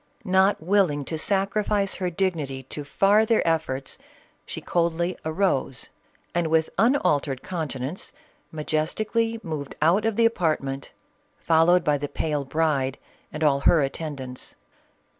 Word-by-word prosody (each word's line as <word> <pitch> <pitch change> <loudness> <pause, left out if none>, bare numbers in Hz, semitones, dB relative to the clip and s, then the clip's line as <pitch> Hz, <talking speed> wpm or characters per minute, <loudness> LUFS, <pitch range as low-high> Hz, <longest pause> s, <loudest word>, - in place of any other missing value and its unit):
Not 190 -2 +3
willing 175 -6 +2
to 160 - -4
sacrifice 200 +1 0
her 180 -2 -1
dignity 165 -8 -2
to 145 +3 -7
farther 210 +8 +3
efforts, 155 -5 -1 0.5
she - - -5
coldly 170 +1 0
arose 160 -6 -1 0.4
and 175 -1 +1
with 160 0 +1
unaltered 170 - +2
countenance, 155 -3 -4 0.4
ma 155 -1 -5
jestically 220 +9 -1
moved 150 -4 -5
out 170 +7 +3
of 225 -2 +1
the 230 +1 +3
apartment, 155 -10 0 0.5
followed 170 +2 +4
by 145 -2 +1
the 145 0 -4
pale 150 -3 -2
bride 140 -3 0 0.3
and 155 - -4
all 140 -2 +3
her 150 +2 +4
attendants. 135 -3 -6
160 Hz, 125 wpm, -25 LUFS, 145-190 Hz, 0.5 s, followed